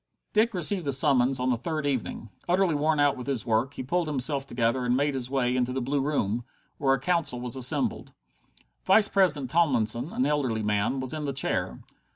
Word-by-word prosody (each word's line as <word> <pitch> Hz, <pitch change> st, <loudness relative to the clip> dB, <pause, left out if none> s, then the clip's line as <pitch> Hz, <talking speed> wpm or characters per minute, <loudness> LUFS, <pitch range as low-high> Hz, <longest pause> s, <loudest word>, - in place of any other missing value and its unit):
Dick 220 Hz, 0 st, +2 dB
received 180 Hz, -1 st, +1 dB
a -, -, +1 dB
summons 135 Hz, -2 st, +3 dB
on 130 Hz, 0 st, 0 dB
the -, -, +2 dB
third 155 Hz, +5 st, -4 dB
evening. 125 Hz, -4 st, -3 dB, 0.2 s
Utterly 180 Hz, -1 st, +2 dB
worn 150 Hz, +1 st, +1 dB
out 145 Hz, -1 st, +3 dB
with 125 Hz, -, -8 dB
his 130 Hz, -6 st, -2 dB
work, 120 Hz, +4 st, 0 dB
he -, -, -5 dB
pulled 170 Hz, +5 st, -1 dB
himself 140 Hz, -1 st, -1 dB
together 120 Hz, +1 st, 0 dB
and 125 Hz, +1 st, +1 dB
made 145 Hz, +1 st, +1 dB
his 130 Hz, -2 st, -4 dB
way 125 Hz, -2 st, 0 dB
into 125 Hz, 0 st, 0 dB
the 130 Hz, -, -2 dB
Blue 135 Hz, +3 st, -1 dB
Room, 120 Hz, -6 st, -1 dB, 0.4 s
where 135 Hz, -1 st, +2 dB
the -, -, -14 dB
Council 170 Hz, -8 st, 0 dB
was 125 Hz, 0 st, -3 dB
assembled. 130 Hz, -1 st, 0 dB, 0.7 s
Vice 205 Hz, +2 st, +5 dB
president 150 Hz, -10 st, +1 dB
Tomlinson, 130 Hz, -4 st, +1 dB
an 130 Hz, -, 0 dB
elderly 135 Hz, -7 st, 0 dB
man, 105 Hz, +5 st, 0 dB
was 130 Hz, +1 st, -3 dB
in 155 Hz, -1 st, -4 dB
the 140 Hz, -, -2 dB
chair. 135 Hz, -, -2 dB
135 Hz, 200 wpm, -26 LUFS, 125-150 Hz, 0.7 s, Vice